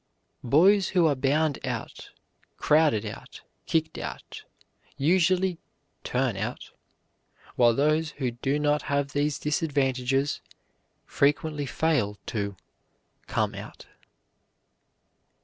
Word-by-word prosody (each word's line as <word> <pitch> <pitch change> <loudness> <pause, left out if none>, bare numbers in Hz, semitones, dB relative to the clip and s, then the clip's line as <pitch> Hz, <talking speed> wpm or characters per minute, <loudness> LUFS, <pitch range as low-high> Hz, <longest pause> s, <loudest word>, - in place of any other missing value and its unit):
Boys 185 - +4
who 175 - +5
are 155 - +4
bound 145 +3 0
out, - - -5 0.5
crowded 150 -8 +3
out, 105 - -9 0.3
kicked 160 -1 0
out, - - -7 0.5
usually 180 +4 +2 0.4
"turn - - 0
out," - - -5 0.8
while 120 -2 +4
those 155 +3 +2
who 130 -4 -1
do 135 +4 -1
not 150 0 +1
have 140 -1 0
these 145 0 0
disadvantages 135 -3 0 0.6
frequently 145 0 0
fail 130 -9 0
to 100 -3 -3 0.7
"come - - 0
out." - - -10
145 Hz, 95 wpm, -26 LUFS, 135-160 Hz, 0.8 s, who